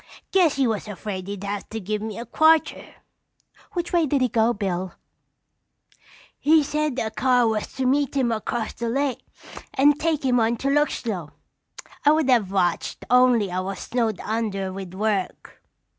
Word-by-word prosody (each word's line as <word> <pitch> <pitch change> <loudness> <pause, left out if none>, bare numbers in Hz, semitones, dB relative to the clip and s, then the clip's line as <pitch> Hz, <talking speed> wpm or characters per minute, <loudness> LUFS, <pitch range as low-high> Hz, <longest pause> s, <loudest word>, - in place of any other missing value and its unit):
Guess 355 -6 +3
he 275 -1 +2
was 220 -3 -2
afraid 195 -2 -6
he'd 200 -1 -6
have 200 0 -4
to 225 - -5
give 210 +1 -3
me 215 -1 -5
a 235 - -6
quarter." 315 +3 +2 0.8
"Which 345 0 -3
way 335 -3 +3
did 275 -1 +1
he 255 - +2
go, 225 +1 +2
Bill?" 190 -4 -3 1.4
"He 310 +1 +4
said 300 -2 -1
a 220 -3 -2
car 250 -1 +2
was 220 -1 -2
to 265 - -2
meet 280 +1 +1
him 250 -3 +2
across 225 +1 -3
the 235 -1 -4
lake 270 +1 -1 0.5
and 290 +2 +4
take 310 -3 0
him 250 -2 +3
on 230 +1 +1
to 275 - -1
Luxlow. 235 - -1 0.7
I 295 - +6
would 310 -4 +2
have 215 -6 +2
watched 180 -3 -1
only 250 -6 +4
I 180 - -1
was 190 +1 -4
snowed 230 -4 -2
under 205 -4 -2
with 190 -1 -8
work." 205 -2 -3
230 Hz, 170 wpm, -23 LUFS, 205-275 Hz, 1.4 s, I